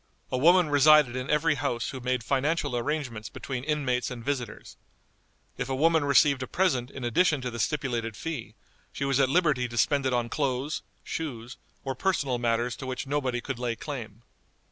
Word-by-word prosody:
A 130 Hz, -, 0 dB
woman 170 Hz, +2 st, +5 dB
resided 145 Hz, -3 st, +6 dB
in 130 Hz, +2 st, -4 dB
every 150 Hz, 0 st, +3 dB
house 125 Hz, -4 st, -2 dB
who 130 Hz, -, -6 dB
made 125 Hz, -1 st, -1 dB
financial 140 Hz, +2 st, 0 dB
arrangements 120 Hz, -4 st, -3 dB
between 130 Hz, -3 st, -5 dB
inmates 135 Hz, -4 st, 0 dB
and 120 Hz, -3 st, -8 dB
visitors. 135 Hz, -4 st, -4 dB, 0.8 s
If 125 Hz, -, -2 dB
a 135 Hz, -, 0 dB
woman 160 Hz, +2 st, +3 dB
received 140 Hz, -1 st, +4 dB
a 130 Hz, -, -3 dB
present 130 Hz, -10 st, +1 dB
in 135 Hz, -, -8 dB
addition 150 Hz, +6 st, +2 dB
to 125 Hz, -1 st, -3 dB
the 115 Hz, -, -6 dB
stipulated 120 Hz, -5 st, -1 dB
fee, 120 Hz, -9 st, -5 dB, 0.4 s
she 140 Hz, -, -3 dB
was 135 Hz, 0 st, +1 dB
at 135 Hz, -2 st, +4 dB
liberty 150 Hz, -6 st, +2 dB
to 120 Hz, 0 st, -8 dB
spend 140 Hz, +4 st, +2 dB
it -, -, 0 dB
on 120 Hz, -1 st, +1 dB
clothes, 140 Hz, +2 st, -1 dB, 0.2 s
shoes, 125 Hz, -6 st, -5 dB, 0.3 s
or 135 Hz, -, -2 dB
personal 135 Hz, -5 st, 0 dB
matters 120 Hz, 0 st, 0 dB
to 130 Hz, -, -7 dB
which 130 Hz, 0 st, -4 dB
nobody 135 Hz, -3 st, -1 dB
could 120 Hz, -, -5 dB
lay 120 Hz, -2 st, -1 dB
claim. 115 Hz, -6 st, -7 dB
130 Hz, 185 wpm, -27 LUFS, 120-145 Hz, 0.8 s, resided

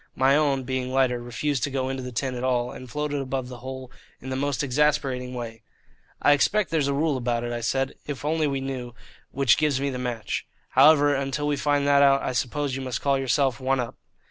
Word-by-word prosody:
My 135 Hz, +2 st, +4 dB
own, 140 Hz, -3 st, +2 dB
being 130 Hz, 0 st, -3 dB
lighter, 130 Hz, -2 st, +2 dB
refused 125 Hz, +3 st, -2 dB
to -, -, -4 dB
go 130 Hz, -1 st, -2 dB
into 135 Hz, 0 st, -3 dB
the 125 Hz, 0 st, -6 dB
tin 130 Hz, +2 st, -2 dB
at 125 Hz, 0 st, -5 dB
all, 125 Hz, -1 st, 0 dB
and 130 Hz, -1 st, -10 dB
floated 145 Hz, +2 st, -2 dB
above 130 Hz, -1 st, -3 dB
the 125 Hz, -1 st, -9 dB
hole 130 Hz, 0 st, -7 dB, 0.3 s
in 130 Hz, -, -7 dB
the -, -, -1 dB
most 140 Hz, +1 st, -1 dB
exasperating 135 Hz, -2 st, 0 dB
way. 115 Hz, -2 st, -6 dB, 0.6 s
"I -, -, +4 dB
expect 195 Hz, +8 st, +2 dB
there's 155 Hz, -4 st, +1 dB
a 140 Hz, -, +1 dB
rule 150 Hz, -1 st, +1 dB
about 120 Hz, -1 st, -1 dB
it," 120 Hz, 0 st, -3 dB
I 120 Hz, -, -3 dB
said, 135 Hz, +3 st, 0 dB
"if 145 Hz, -2 st, -5 dB
we 150 Hz, -, 0 dB
only 150 Hz, -4 st, 0 dB
knew, 125 Hz, -3 st, -5 dB, 0.3 s
which 135 Hz, -4 st, +3 dB
gives 150 Hz, -3 st, +1 dB
me 140 Hz, 0 st, -1 dB
the 125 Hz, -, -4 dB
match. 120 Hz, -3 st, -3 dB, 0.2 s
However, 145 Hz, +1 st, +6 dB
until 140 Hz, +1 st, -2 dB
we 145 Hz, 0 st, +1 dB
find 145 Hz, 0 st, +1 dB
that 140 Hz, 0 st, +5 dB
out, 140 Hz, -1 st, +5 dB
I -, -, -1 dB
suppose 130 Hz, +2 st, -1 dB
you 135 Hz, -, -4 dB
must 130 Hz, -3 st, -3 dB
call 140 Hz, -1 st, +1 dB
yourself 135 Hz, 0 st, +1 dB
one 135 Hz, 0 st, +1 dB
up." 120 Hz, -1 st, -3 dB
135 Hz, 225 wpm, -25 LUFS, 125-145 Hz, 0.6 s, However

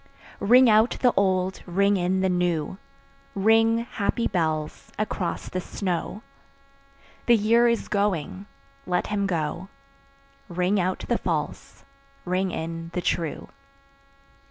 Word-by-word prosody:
Ring 250 Hz, +5 st, +6 dB
out 220 Hz, +2 st, +4 dB
the 245 Hz, -, +5 dB
old, 185 Hz, -1 st, +1 dB
ring 200 Hz, +3 st, +2 dB
in 185 Hz, 0 st, 0 dB
the 190 Hz, -, +2 dB
new, 180 Hz, -1 st, -1 dB, 0.6 s
Ring, 225 Hz, +3 st, +3 dB
happy 230 Hz, +1 st, -1 dB
bells, 155 Hz, -4 st, -2 dB
across 195 Hz, -4 st, -3 dB
the 185 Hz, -, -3 dB
snow: 185 Hz, +3 st, -4 dB, 1.0 s
The 240 Hz, -, +7 dB
year 230 Hz, +3 st, +4 dB
is 235 Hz, -1 st, 0 dB
going, 200 Hz, -2 st, -1 dB, 0.4 s
let 180 Hz, -1 st, 0 dB
him 200 Hz, -1 st, 0 dB
go; 170 Hz, +1 st, -3 dB, 0.8 s
Ring 180 Hz, +3 st, +1 dB
out 185 Hz, +1 st, -1 dB
the -, -, +1 dB
false, -, -, -4 dB, 0.4 s
ring 185 Hz, +1 st, 0 dB
in 165 Hz, 0 st, -5 dB
the 180 Hz, -, -1 dB
true. 165 Hz, -3 st, -2 dB
190 Hz, 120 wpm, -25 LUFS, 175-210 Hz, 1.0 s, The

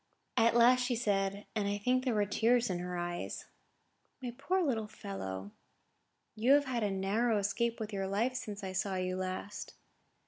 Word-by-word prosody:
At 230 Hz, +1 st, +4 dB
last 245 Hz, +2 st, +7 dB
she 245 Hz, -1 st, 0 dB
said, 200 Hz, -2 st, 0 dB
and 205 Hz, -2 st, +1 dB
I 205 Hz, 0 st, 0 dB
think 255 Hz, +5 st, +1 dB
the 215 Hz, -5 st, +2 dB
tears 235 Hz, +3 st, +3 dB
were -, -, 0 dB
in 175 Hz, -, -3 dB
her 180 Hz, 0 st, -4 dB
eyes: 175 Hz, 0 st, -4 dB, 0.7 s
"My 250 Hz, -3 st, -5 dB
poor 365 Hz, +8 st, +1 dB
little 225 Hz, -8 st, 0 dB
fellow, 100 Hz, -, -6 dB, 0.8 s
you 230 Hz, +5 st, +4 dB
have 285 Hz, 0 st, +5 dB
had 250 Hz, -3 st, -1 dB
a 210 Hz, -, +1 dB
narrow 205 Hz, +4 st, +1 dB
escape 205 Hz, +4 st, 0 dB
with 215 Hz, -1 st, -4 dB
your 195 Hz, -1 st, -1 dB
life 220 Hz, +6 st, +1 dB
since 210 Hz, -4 st, -5 dB
I 190 Hz, -, -3 dB
saw 190 Hz, +1 st, -1 dB
you 185 Hz, 0 st, -1 dB
last." 185 Hz, +2 st, -4 dB
210 Hz, 180 wpm, -33 LUFS, 195-240 Hz, 0.8 s, last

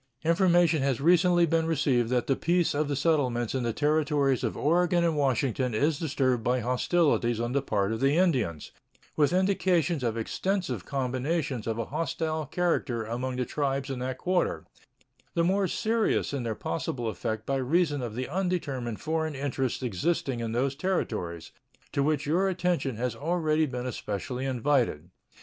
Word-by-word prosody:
Information 170 Hz, -2 st, +4 dB
has 135 Hz, -3 st, 0 dB
recently 175 Hz, +3 st, +4 dB
been 165 Hz, 0 st, +1 dB
received 135 Hz, -7 st, +1 dB
that 125 Hz, -1 st, +1 dB
the 135 Hz, -, +1 dB
peace 175 Hz, +3 st, +1 dB
of 150 Hz, +1 st, 0 dB
the 145 Hz, -, -1 dB
settlements 130 Hz, -6 st, +1 dB
in 130 Hz, -, -1 dB
the 120 Hz, -1 st, 0 dB
Territories 145 Hz, -1 st, +1 dB
of 115 Hz, -, -2 dB
Oregon 175 Hz, +2 st, +2 dB
and 165 Hz, -2 st, +1 dB
Washington 130 Hz, -3 st, 0 dB
is 145 Hz, +6 st, +1 dB
disturbed 130 Hz, -6 st, 0 dB
by 125 Hz, +2 st, +1 dB
hostilities 125 Hz, -1 st, +1 dB
on 120 Hz, +1 st, -1 dB
the 140 Hz, +2 st, +1 dB
part 105 Hz, -6 st, 0 dB
of 110 Hz, -, -2 dB
the 140 Hz, +3 st, +2 dB
Indians, 125 Hz, -, +1 dB, 0.4 s
with 150 Hz, 0 st, +3 dB
indications 180 Hz, -4 st, +2 dB
of 115 Hz, -1 st, -1 dB
extensive 135 Hz, -, -2 dB
combinations 130 Hz, 0 st, -2 dB
of 115 Hz, -1 st, -1 dB
a 115 Hz, -, -2 dB
hostile 155 Hz, 0 st, -2 dB
character 145 Hz, -10 st, 0 dB
among 125 Hz, +3 st, -3 dB
the 125 Hz, 0 st, -1 dB
tribes 135 Hz, 0 st, -2 dB
in 130 Hz, -, -4 dB
that 130 Hz, +1 st, -3 dB
quarter, 180 Hz, +5 st, 0 dB, 0.7 s
the 170 Hz, -, +3 dB
more 190 Hz, +2 st, +2 dB
serious 220 Hz, -2 st, 0 dB
in 140 Hz, -, -1 dB
their 115 Hz, -2 st, -2 dB
possible 115 Hz, +8 st, -3 dB
effect 110 Hz, 0 st, -3 dB
by 135 Hz, -, 0 dB
reason 145 Hz, +2 st, +1 dB
of 115 Hz, -3 st, -5 dB
the 130 Hz, +1 st, -3 dB
undetermined 145 Hz, -, -2 dB
foreign 160 Hz, -1 st, -2 dB
interests 135 Hz, -2 st, -2 dB
existing 125 Hz, -, -1 dB
in 115 Hz, -1 st, -3 dB
those 130 Hz, +4 st, 0 dB
Territories, 90 Hz, -, -3 dB, 0.4 s
to 140 Hz, -, 0 dB
which 150 Hz, 0 st, +1 dB
your 180 Hz, +6 st, +2 dB
attention 175 Hz, -8 st, -1 dB
has 120 Hz, +1 st, -2 dB
already 155 Hz, +1 st, +1 dB
been 125 Hz, -2 st, -4 dB
especially 125 Hz, +2 st, -4 dB
invited. 120 Hz, -, 0 dB
140 Hz, 165 wpm, -28 LUFS, 125-165 Hz, 0.7 s, Information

